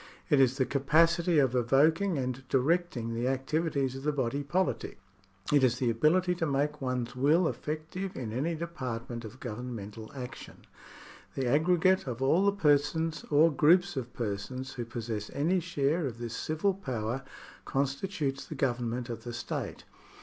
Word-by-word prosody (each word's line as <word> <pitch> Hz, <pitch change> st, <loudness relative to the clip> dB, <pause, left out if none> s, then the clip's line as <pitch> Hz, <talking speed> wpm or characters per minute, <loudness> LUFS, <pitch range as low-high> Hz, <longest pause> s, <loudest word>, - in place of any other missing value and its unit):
It 145 Hz, -, +5 dB
is 130 Hz, 0 st, +4 dB
the 130 Hz, -, +2 dB
capacity 165 Hz, +5 st, +3 dB
of 135 Hz, -4 st, +4 dB
evoking 150 Hz, +9 st, +3 dB
and 130 Hz, 0 st, -3 dB
directing 135 Hz, -4 st, +1 dB
the 120 Hz, +2 st, -1 dB
activities 135 Hz, 0 st, 0 dB
of 135 Hz, -, -6 dB
the 150 Hz, +2 st, +1 dB
body 140 Hz, -1 st, -1 dB
politic. 180 Hz, +6 st, -1 dB, 0.6 s
It 145 Hz, -2 st, +5 dB
is 125 Hz, -1 st, +3 dB
the 125 Hz, -2 st, +1 dB
ability 170 Hz, +10 st, +3 dB
to -, -, +3 dB
make 145 Hz, +1 st, 0 dB
one's 125 Hz, -2 st, -2 dB
will 155 Hz, +7 st, +3 dB
effective 160 Hz, +6 st, -4 dB
in 110 Hz, -4 st, -5 dB
any 155 Hz, +8 st, -1 dB
department 125 Hz, -8 st, -5 dB
of 115 Hz, +4 st, -10 dB
governmental 115 Hz, -3 st, -6 dB
action. 125 Hz, -2 st, -9 dB, 0.7 s
The 135 Hz, -, -1 dB
aggregate 175 Hz, +6 st, +3 dB
of 120 Hz, -2 st, -4 dB
all 140 Hz, +8 st, +3 dB
the 200 Hz, -, +5 dB
persons 160 Hz, -2 st, +1 dB
or 155 Hz, +3 st, +5 dB
groups 175 Hz, +6 st, +4 dB
of 125 Hz, -3 st, -4 dB
persons 120 Hz, +4 st, -4 dB
who 120 Hz, -2 st, -4 dB
possess 110 Hz, -2 st, -4 dB
any 170 Hz, +6 st, +2 dB
share 150 Hz, 0 st, 0 dB
of 120 Hz, -3 st, -6 dB
this 120 Hz, -1 st, -5 dB
civil 160 Hz, +6 st, 0 dB
power 130 Hz, -, -3 dB, 0.4 s
constitutes 140 Hz, 0 st, -1 dB
the 155 Hz, -, -6 dB
Government 120 Hz, -2 st, -1 dB
of 115 Hz, -2 st, -6 dB
the 120 Hz, -, -6 dB
state. 115 Hz, -1 st, -4 dB
135 Hz, 155 wpm, -30 LUFS, 120-160 Hz, 0.7 s, It